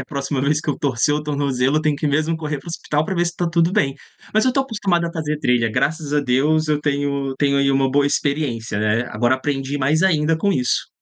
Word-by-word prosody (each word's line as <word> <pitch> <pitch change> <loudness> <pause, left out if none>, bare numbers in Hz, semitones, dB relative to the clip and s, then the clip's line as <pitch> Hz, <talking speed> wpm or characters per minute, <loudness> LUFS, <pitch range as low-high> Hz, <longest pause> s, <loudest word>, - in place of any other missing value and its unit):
na - - -6
próxima 140 -1 -3
vez 145 +2 +1
que 155 - -8
eu 145 - 0
torcer 140 +1 +1
o 150 - -2
tornozelo, 140 -2 0
eu - - +2
tenho 155 -1 +1
que 145 +1 -2
mesmo 155 +3 0
correr 150 -2 -4
para 135 - -17
o - - -6
hospital 150 -2 -1
pra 190 - -3
ver 175 -1 +1
se 170 0 -4
tá 175 - 0
tudo 170 +1 +2
bem. 190 -10 +1 0.4
Mas 215 - +3
eu - - +3
estou 270 +1 +1
acostumado 195 -8 0
a 170 - -5
fazer 150 -2 -3
trilha, 125 -5 +1
graças 145 +5 -1
a 150 - +3
Deus, 145 +4 +1
eu 150 -1 +1
tenho 145 -1 0 0.2
eu 135 - -7
tenho 140 -1 +2
aí 140 0 +3
uma 135 0 +2
boa 140 +2 +2
experiência, 140 -8 -1
né. 110 +3 +1
Agora 120 +4 +1
aprendi 135 +1 -3
mais 150 +5 +1
ainda 160 -4 +2
com 200 +5 +1
isso. 125 -8 0
145 Hz, 255 wpm, -20 LUFS, 135-160 Hz, 0.4 s, Mas